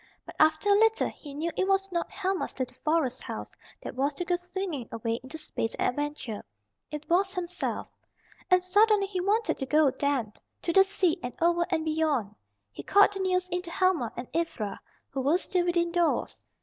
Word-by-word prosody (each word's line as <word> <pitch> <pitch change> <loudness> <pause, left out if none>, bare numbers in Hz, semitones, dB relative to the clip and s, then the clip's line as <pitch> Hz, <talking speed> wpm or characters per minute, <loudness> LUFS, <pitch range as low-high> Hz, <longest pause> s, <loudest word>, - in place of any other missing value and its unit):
But - - -11
after 315 +4 +4
a - - +5
little 445 0 +3
he 285 -2 -11
knew 325 +3 -2
it 380 - +1
was 390 0 +1
not 340 -1 -1
Helma's 385 -1 -2
little 255 -2 -3
forest 305 -5 +1
house - - -6 0.3
that - - -5
was 275 +3 0
to 355 - -3
go 355 - +2
swinging 355 -7 -4
away 230 +1 -2
into 260 +5 -8
space 300 -7 -3
and - - +1
adventure, 290 -5 -4 0.5
it 300 0 -7
was 375 +3 +2
himself. 360 -1 -3 0.6
And 365 0 +5
suddenly 410 +2 +4
he 380 -2 -3
wanted 425 +4 +1
to 270 - -2
go 300 -1 +4
then, 265 -5 -1 0.3
to 335 - 0
the 385 - +8
sea 380 -3 +1
and 245 - -5
over 340 0 +2
and 325 -3 0
beyond. 305 -9 0 0.4
He - - -8
called 410 +1 +5
the 390 - -5
news 365 -1 +1
in 360 0 -1
to 350 - -8
Helma 340 - +1
and 240 - -5
Ivra, 230 -12 -2 0.3
who 270 - -2
were 290 +6 +3
still 360 -1 0
within 345 -1 +1
doors. 345 -1 0
340 Hz, 195 wpm, -28 LUFS, 285-370 Hz, 0.6 s, the